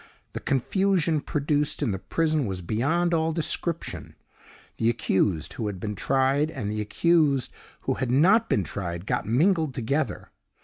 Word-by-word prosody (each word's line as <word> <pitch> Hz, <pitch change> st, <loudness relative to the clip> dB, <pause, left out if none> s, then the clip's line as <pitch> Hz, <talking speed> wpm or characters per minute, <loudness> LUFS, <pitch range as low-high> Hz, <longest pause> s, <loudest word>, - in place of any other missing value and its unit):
The -, -, -4 dB
confusion 165 Hz, -, +1 dB
produced 150 Hz, -1 st, -1 dB
in 110 Hz, -, +1 dB
the 95 Hz, -, -3 dB
prison 155 Hz, -, 0 dB
was 95 Hz, -2 st, -4 dB
beyond 160 Hz, -, 0 dB
all 160 Hz, 0 st, +1 dB
description. 165 Hz, +1 st, -3 dB, 0.6 s
The 115 Hz, -, +2 dB
accused 95 Hz, -7 st, 0 dB
who 110 Hz, -, -3 dB
had 100 Hz, -3 st, -5 dB
been 105 Hz, +2 st, -3 dB
tried 135 Hz, +7 st, +1 dB
and 125 Hz, -10 st, -4 dB
the 105 Hz, 0 st, -2 dB
accused 145 Hz, +3 st, +2 dB, 0.3 s
who -, -, 0 dB
had 130 Hz, -2 st, -2 dB
not 175 Hz, -, +4 dB
been 100 Hz, -, +2 dB
tried 85 Hz, +2 st, -5 dB
got -, -, -1 dB
mingled 155 Hz, -, +2 dB
together. 140 Hz, +6 st, -2 dB
140 Hz, 150 wpm, -26 LUFS, 105-160 Hz, 0.6 s, not